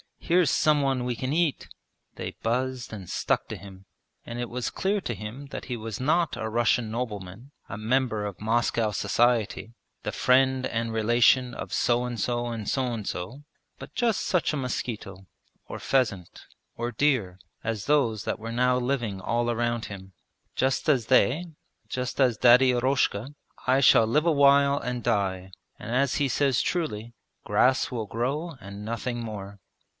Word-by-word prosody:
Here's 175 -3 +2
some 150 +1 +3
one 135 -2 0
we 125 -1 -2
can 130 +4 -3
eat!' 165 -3 0 0.5
They - - -6
buzzed 125 +1 -2
and 95 -5 -8
stuck - - 0
to - - -5
him. 95 -1 -13 0.4
And 120 +1 -6
it 120 -1 -3
was 125 0 -3
clear 200 +1 0
to 120 - -3
him 110 +7 -8
that - - -7
he 125 - -3
was 110 -2 -6
not 160 +2 +1
a 110 -2 -3
Russian 115 0 +1
nobleman, 110 0 -5 0.2
a 95 - -6
member 110 -1 0
of 100 -3 -6
Moscow 115 0 +1
society, 115 +2 +1 0.3
the - - -3
friend 130 0 +3
and 115 0 -2
relation 120 +3 +3
of - - -7
so 120 0 +2
and 120 -1 -4
so 120 +2 -1
and 115 -3 -5
so 130 -1 0
and 110 -3 -5
so, 110 +13 -5 0.3
but - - -11
just 235 -4 +1
such 180 -4 +1
a - - -1
mosquito, 110 -7 -4 0.4
or - - -7
pheasant, 105 -10 -1 0.3
or 120 +1 -2
deer, 115 -9 +1 0.3
as 110 -3 -3
those 125 -8 +2
that - - -3
were 115 +1 -6
now 125 +1 +2
living 120 -6 -1
all 120 +4 0
around 120 0 -1
him. 95 -2 -9 0.4
'Just 130 +3 0
as 130 -7 +2
they, 135 +5 +3 0.4
just 125 +3 -2
as 125 -4 +3
Daddy 125 +2 +6
Eroshka, 125 0 0 0.3
I 130 +2 +4
shall 115 -4 +6
live 150 +7 +2
awhile 140 -2 +5
and 125 -1 -4
die, 95 -2 -1 0.3
and 115 - -6
as 135 +1 +2
he 140 -2 +1
says 135 -2 +2
truly: 120 -10 -2 0.3
"grass 130 0 +2
will 115 -4 -3
grow 140 - -2
and 100 +2 -8
nothing 120 +2 -3
more". 100 -3 -7
120 Hz, 170 wpm, -26 LUFS, 110-130 Hz, 0.5 s, Daddy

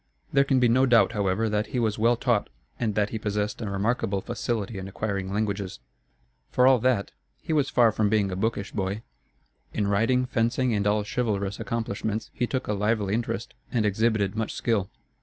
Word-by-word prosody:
There 140 - +5
can 135 -1 +2
be 125 - +4
no 130 +3 +4
doubt, 120 -3 +5
however, 105 0 0
that 105 0 0
he 125 - -2
was 110 -2 0
well 115 +2 +4
taught, 120 -4 +1 0.3
and 110 -4 -1
that 105 -1 +1
he 110 - -3
possessed 105 +1 -2
a 110 - -3
remarkable 100 0 0
facility 115 -2 -3
in 95 - -6
acquiring 95 -1 -3
languages. 100 -2 -2 0.7
For 125 - +3
all 130 -1 +6
that, 120 -4 +1 0.3
he 160 - -3
was 145 -3 +2
far 120 -3 +4
from 105 -1 +1
being 105 -2 +2
a - - -2
bookish 100 0 -2
boy. 100 +2 -3 0.7
In 105 - +1
riding, 115 +6 +2
fencing, 120 +1 +1
and 100 -1 +1
all 105 0 +2
chivalrous 100 -3 -2
accomplishments 110 -1 -3
he 120 - -1
took 130 0 -2
a 105 - 0
lively 105 -1 0
interest 115 -1 -2 0.2
and 115 -3 +1
exhibited 105 -1 +1
much 110 -1 -2
skill. 105 -5 0
110 Hz, 190 wpm, -26 LUFS, 100-120 Hz, 0.7 s, all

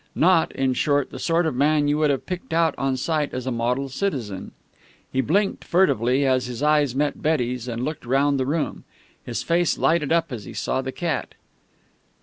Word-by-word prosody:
Not, 170 -1 +3
in 135 -1 0
short, 145 +1 +1
the - - -7
sort 170 0 +1
of 160 - 0
man 145 +2 +2
you 145 +1 +1
would 155 -1 +3
have 140 -2 -1
picked 180 -3 -5
out 165 -2 +3
on 135 -1 0
sight 150 +1 -1
as 130 -1 -4
a 130 - -1
model 125 +3 -1
citizen. 130 - -3 0.6
He 130 - +1
blinked 195 - 0
furtively, 135 - +2
as 130 -2 +2
his 125 +3 -5
eyes 150 -4 +3
met 145 +1 -1
Betty's, 125 -5 0
and 120 +1 -3
looked 150 -5 -5
round 140 +2 +2
the 130 - -1
room. 155 +2 -2 0.4
His - - -4
face 170 0 +1
lighted 160 -3 +1
up 165 -2 +2
as 110 -5 -6
he - - -9
saw 130 - -1
the 130 - -4
cat. 160 -2 -3
145 Hz, 195 wpm, -23 LUFS, 130-160 Hz, 0.6 s, Not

